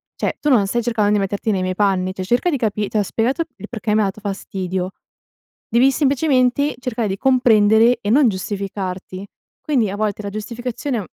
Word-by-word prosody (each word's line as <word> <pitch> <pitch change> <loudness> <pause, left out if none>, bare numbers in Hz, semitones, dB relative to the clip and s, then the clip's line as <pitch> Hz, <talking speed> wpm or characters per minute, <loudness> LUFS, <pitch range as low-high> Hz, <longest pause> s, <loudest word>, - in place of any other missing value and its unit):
cioè - - -2
tu 295 - +1
non 235 -7 +4
stai 240 +4 0
cercando 220 -3 +1
di 210 - +3
metterti 200 +2 -1
nei 190 -2 0
miei 185 0 -2
panni, 185 -2 +1
cioè 185 - -5
cerca 240 - +1
di 285 - 0
capi 215 -4 -1
t'ho 210 -1 +1
spiegato 245 - 0
il 210 +1 -9
perché 225 -3 -2
mi 215 - +3
ha - - +2
dato 195 +2 -7
fastidio, 190 -2 -4 0.8
devi 250 +4 +4
semplicemente 275 -1 +2
cercare 240 -3 -2
di 190 - -2
comprendere 230 -2 +4
e 205 - -3
non 275 +2 +5
giustificarti. 190 -1 -5 0.3
Quindi 255 -9 +1
a 195 - -4
volte 210 -1 -1
la 200 - -4
giustificazione, 235 +5 -4
mhmm 200 - -6
215 Hz, 195 wpm, -20 LUFS, 195-245 Hz, 0.8 s, non